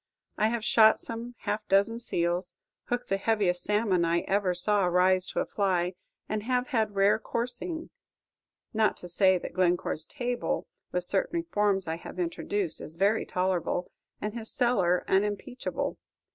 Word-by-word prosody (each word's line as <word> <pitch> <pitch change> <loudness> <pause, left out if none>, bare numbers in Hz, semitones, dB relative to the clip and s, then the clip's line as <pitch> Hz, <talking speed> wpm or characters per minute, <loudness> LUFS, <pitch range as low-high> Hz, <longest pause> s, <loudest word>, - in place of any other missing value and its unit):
I 215 - +2
have 225 -1 -2
shot 220 -1 +6
some 235 +1 -6
half 210 0 -3
dozen 200 +4 +3
seals, 175 -4 +1 0.3
hooked 245 0 -3
the 195 - +2
heaviest 195 -4 +1
salmon 205 -4 +2
I 170 +1 +2
ever 195 -2 0
saw 205 +2 +2
rise 185 +1 +3
to - - -1
a - - -1
fly, 185 -3 0 0.3
and 215 0 -2
have 250 +4 0
had 220 -6 0
rare 200 +2 +4
coursing, 250 +10 -4 0.8
not 220 -1 +2
to 180 - -8
say 185 +1 +4
that - - -7
Glencore's 175 -3 +1
table, 245 -3 -2 0.3
with 180 - -1
certain 200 - 0
reforms 205 - 0
I 160 0 -2
have 170 - -10
introduced, 180 +1 -2
is 155 - -8
very 200 +5 +2
tolerable, 180 -1 -1 0.3
and 210 0 -3
his 225 -2 -6
cellar 195 -9 +2
unimpeachable. 210 +6 -1
200 Hz, 155 wpm, -28 LUFS, 180-225 Hz, 0.8 s, shot